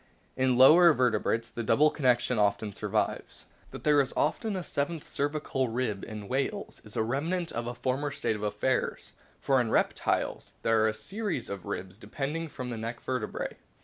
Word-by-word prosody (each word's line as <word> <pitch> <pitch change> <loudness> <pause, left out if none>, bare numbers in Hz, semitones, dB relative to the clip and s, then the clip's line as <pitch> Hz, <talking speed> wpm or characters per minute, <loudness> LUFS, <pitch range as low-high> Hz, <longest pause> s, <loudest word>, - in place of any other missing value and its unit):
In 130 -1 +2
lower 165 +6 +8
vertebrates 115 -2 +1
the 120 - -4
double 150 +7 +4
condition 125 -4 +2
often 105 0 +1
survives. - - -2 0.2
That - - -9
there 150 -1 +5
is 135 - -3
often 205 +7 0
a 185 - -3
seventh 155 +1 -3
cervical 140 -3 -1
rib 115 -4 -2
in 105 -2 -7
whales 140 - -2
is 105 0 -11
a 110 - +2
remnant 160 +9 -1
of 120 0 -3
a 120 - -4
former 130 +4 -1
state 110 - -1
of 105 - -7
affairs; 105 +5 -1 0.3
for 135 -2 +3
in 115 - -2
reptiles - - 0
there 115 -1 +3
are - - +4
a 110 - -1
series 195 - -3
of 100 -2 -6
ribs 95 +2 -5
depending 150 +6 -4
from 125 -4 -6
the 115 - -4
neck 115 +2 -5
vertebrae. 125 -4 -3
130 Hz, 180 wpm, -29 LUFS, 110-145 Hz, 0.3 s, lower